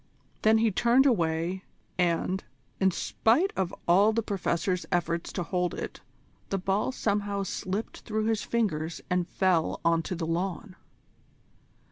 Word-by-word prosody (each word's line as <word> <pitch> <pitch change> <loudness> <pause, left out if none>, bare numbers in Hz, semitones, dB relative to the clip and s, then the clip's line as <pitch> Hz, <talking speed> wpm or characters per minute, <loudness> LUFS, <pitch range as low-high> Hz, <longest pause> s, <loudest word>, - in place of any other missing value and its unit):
Then 220 +1 +5
he 220 0 +3
turned 240 +6 +4
away, 175 -5 +1 0.3
and, 180 +1 0 0.4
in 190 - +4
spite 240 - +1
of 190 -2 -1 0.2
all 195 +5 +5
the 230 +1 0
Professor's 185 -2 -1
efforts 170 -1 0
to 180 - -2
hold 180 0 -1
it, - - -6 0.5
the 195 - 0
ball 195 +5 0
somehow 205 -4 -1
slipped 195 +2 -4
through 215 -1 -2
his 225 -2 +1
fingers 170 -9 -1
and 180 -1 +1
fell 185 -5 +1
on 165 0 +4
to 180 - -4
the 165 -1 -3
lawn. 180 +4 -3
190 Hz, 140 wpm, -28 LUFS, 170-215 Hz, 0.5 s, Then